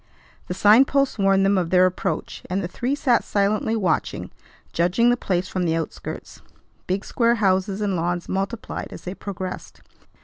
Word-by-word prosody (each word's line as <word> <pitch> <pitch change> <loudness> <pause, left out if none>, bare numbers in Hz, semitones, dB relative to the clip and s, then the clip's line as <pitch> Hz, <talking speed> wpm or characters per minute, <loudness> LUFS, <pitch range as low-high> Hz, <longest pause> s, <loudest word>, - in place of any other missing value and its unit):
The 180 - -4
sign 215 +7 +6
posts 275 -4 0
warned 195 0 +3
them 195 -1 +3
of 175 -2 -2
their 180 +1 +5
approach; 185 0 -2
and 190 +2 -1
the - - -2
three 245 +9 -2
sat 255 -5 +2
silently 210 +2 0
watching, 200 -5 -1 0.4
judging 180 +8 +3
the - - +3
place 185 -6 -1
from 185 - -3
the 165 -1 +1
outskirts. 165 -2 -6 0.5
Big 190 +3 -1
square 235 -1 +2
houses 195 -1 +1
and 200 -2 0
lawns 175 +1 -2
multiplied 195 +4 -3
as - - -10
they 180 - -5
progressed. 190 -2 -7
195 Hz, 170 wpm, -23 LUFS, 180-220 Hz, 0.5 s, sign